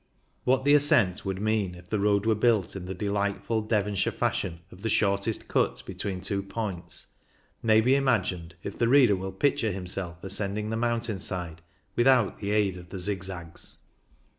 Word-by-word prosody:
What 130 +1 +2
the 145 - +5
ascent 120 -12 +5
would 95 -1 -2
mean 105 -4 0
if 90 0 -14
the 105 - 0
road 100 0 +2
were 110 - +4
built 110 -3 +2
in 95 -2 -6
the 95 - -4
delightful 100 +2 -1
Devonshire 105 -2 0
fashion 85 -2 -2
of 90 - -14
the 115 - -1
shortest 100 +1 +1
cut - - 0
between 95 -2 -4
two 100 +1 -1
points 100 -2 -5 0.6
may 110 -1 +5
be 125 +4 +3
imagined 95 -11 0
if - - -6
the 115 - +3
reader 125 -5 +6
will 95 +1 -5
picture 115 +2 +1
himself 90 -2 -4
ascending 100 +2 -2
the - - -1
mountain 115 -3 0
side 85 -3 -3 0.3
without 120 -3 +3
the 100 - -4
aid 105 -3 +1
of 90 -1 -12
the 95 - -6
zigzags. 90 -3 -4
100 Hz, 170 wpm, -27 LUFS, 95-110 Hz, 0.6 s, reader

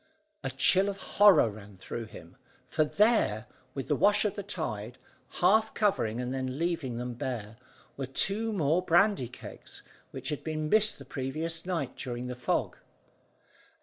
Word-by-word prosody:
A - - -1
chill 195 +2 +3
of 200 - -4
horror 195 - +5
ran 100 -2 -12
through 115 +5 -6
him, 85 -5 -13 0.3
for 155 - +1
there, 155 - +2 0.3
with 135 - -4
the 150 - +2
wash 205 +7 +3
of 210 - +1
the 205 - -5
tide - - -4 0.5
half 220 +4 +4
covering 125 - +1
and 125 +1 -3
then 130 0 -3
leaving 160 -7 -1
them 125 0 -4
bare, 115 -3 -5 0.4
were 135 -2 -3
two 200 +11 +1
more 165 -3 +2
brandy 185 - +3
kegs, 125 - -11 0.3
which - - -4
had 150 - -4
been 155 -1 -3
missed 215 +2 +4
the 140 - -12
previous 160 +7 -4
night 165 -9 -2
during 120 -1 -5
the 125 0 -4
fog. 125 - -1
150 Hz, 160 wpm, -29 LUFS, 125-195 Hz, 0.5 s, horror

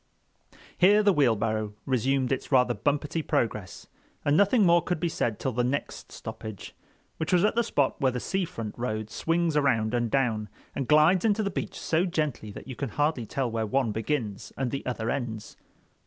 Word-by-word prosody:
Here 205 +4 +6
the 205 -1 +5
wheelbarrow 110 - +1
resumed 130 +1 +1
its 135 - -2
rather 125 -2 +4
bumpety 145 +8 -1
progress, 105 -9 -2 0.4
and 145 - +3
nothing 200 +4 +4
more 170 0 +5
could 180 -1 -2
be 170 - 0
said 115 -8 -1
till 130 - -1
the 120 +1 0
next 135 +4 -3
stoppage, 110 -4 -8 0.4
which 160 - -2
was 180 -1 +4
at - - +2
that 235 - +2
spot 140 - 0
where 130 -1 +3
the 125 - -3
sea 190 +9 -1
front 115 -9 -6
road 110 -3 -3
swings 165 -1 0
around 125 -7 +2
and 120 -1 0
down, 110 -5 0 0.3
and 135 - -2
glides 155 +4 +5
into 215 -1 +2
the 200 - -1
beach - - -4
so 165 +3 +1
gently 150 - -2
that 100 - -10
you 130 - -6
can 140 -1 -3
hardly 145 -2 0
tell 130 0 -2
where 110 -1 -1
one 130 0 +1
begins 110 -2 -3
and 130 -3 -1
the 140 - -3
other 115 -2 -2
ends. 115 -6 -4
135 Hz, 190 wpm, -27 LUFS, 115-160 Hz, 0.4 s, Here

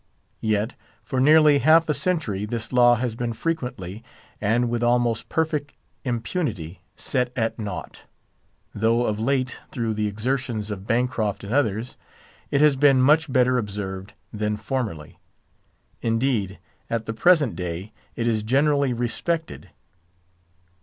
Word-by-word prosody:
Yet, 110 +2 0 0.3
for 130 - -2
nearly 150 +1 +6
half 160 +2 +5
a 150 - +2
century, 145 - -1
this 115 +2 -5
law 120 -1 +6
has 120 -1 -2
been 120 0 -3
frequently, 125 - -4 0.4
and 115 +4 +2
with 120 0 -1
almost 120 -1 +1
perfect 155 -3 -1 0.3
impunity, 120 - -3
set 125 -1 -1
at 115 -1 -1
naught: 100 -7 -6 0.7
though 115 +3 +2
of 105 -1 -1
late, 130 +1 0
through 115 -2 -2
the 105 0 -1
exertions 110 0 -2
of 100 0 -6
Bancroft 115 -4 0
and 100 +3 -5
others, 120 -3 0 0.5
it 140 - +2
has 150 -2 +5
been 135 -1 +5
much 150 +3 +4
better 125 0 +3
observed 100 -2 -5 0.2
than 105 0 -1
formerly; 110 - -4 0.8
indeed, 115 -4 0 0.3
at 115 -1 -2
the 115 - -3
present 145 - +3
day, 90 +3 -5 0.2
it 115 - -2
is 110 -2 +1
generally 140 +3 +2
respected. 160 +8 -3
120 Hz, 135 wpm, -24 LUFS, 105-135 Hz, 0.8 s, nearly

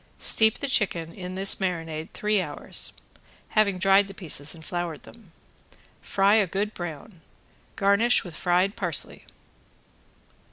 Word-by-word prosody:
Steep 220 -1 +2
the 280 - -3
chicken 170 -9 -1
in 180 -1 -7
this 195 +1 +4
marinade 165 -4 -3
three 210 -1 0
hours, - - -2 0.6
having 205 -3 +2
dried 195 +1 +4
the 195 - -10
pieces 155 -4 -2
and 160 -1 -13
floured 175 -3 -4
them. 225 -7 -16 0.7
Fry 195 +1 +2
a 215 -3 +4
good 205 +4 -2
brown. 175 +2 -8 0.5
Garnish 200 +5 +4
with 175 -4 -10
fried 180 +3 +1
parsley. 175 -9 -1
190 Hz, 130 wpm, -25 LUFS, 170-205 Hz, 0.7 s, this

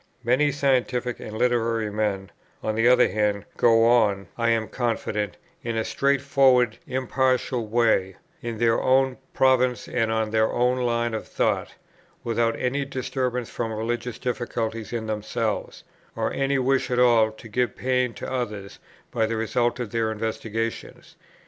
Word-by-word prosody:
Many 130 +5 +3
scientific 130 -3 0
and 110 0 -7
literary 115 -3 +1
men, 105 -2 -2 0.3
on 110 - -1
the 115 +2 +2
other 125 0 +6
hand, 105 -1 -1
go 115 -1 +4
on, 105 -5 +3
I 115 -1 +1
am 115 -1 +1
confident, 110 -4 -2 0.3
in 115 -2 -2
a 110 - 0
straightforward 135 -2 +2
impartial 130 -2 0
way, 110 -4 +2 0.3
in 120 -3 -4
their 115 0 +2
own 130 0 +2 0.2
province 130 -2 +2
and 115 -2 0
on 110 -1 0
their 110 0 +2
own 125 +1 +1
line 120 -1 0
of 110 - -4
thought, - - -1 0.5
without 115 0 0
any 135 +3 0
disturbance 130 -2 -3
from 115 -2 -3
religious 115 +2 -3
difficulties 115 -3 -3
in 115 -2 -3
themselves, 110 +1 -3 0.3
or - - -1
any 135 0 +1
wish 135 +1 +1
at 125 - 0
all 120 -3 +5
to 110 - -13
give 125 +2 -1
pain 125 -2 0
to - - -6
others 105 -6 -4 0.3
by 115 -2 +1
the 115 - -2
result 120 +2 0
of 120 -4 -4
their 115 0 0
investigations. 110 +1 -4
120 Hz, 150 wpm, -24 LUFS, 110-125 Hz, 0.5 s, other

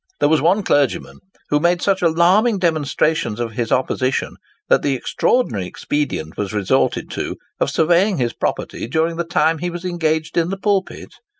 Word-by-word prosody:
There - - +3
was 155 -3 +3
one 185 +7 +2
clergyman, 145 -6 0 0.3
who 145 - +2
made 175 +2 +2
such 195 -1 +1
alarming 180 +7 +3
demonstrations 155 - 0
of 120 -2 -2
his 115 0 -3
opposition, 130 0 0 0.3
that - - +4
the 140 -2 0
extraordinary 120 - 0
expedient 90 - -3
was 100 -1 -3
resorted 100 -3 0
to - - -4 0.2
of - - +1
surveying 175 +4 +2
his 120 -3 -1
property - - -3
during 160 +5 0
the 170 - 0
time 165 -1 +1
he 175 +2 -2
was 175 +1 -7
engaged 160 -2 -1
in 170 0 +2
the 195 - -3
pulpit. 195 -1 -2
160 Hz, 170 wpm, -19 LUFS, 135-175 Hz, 0.3 s, that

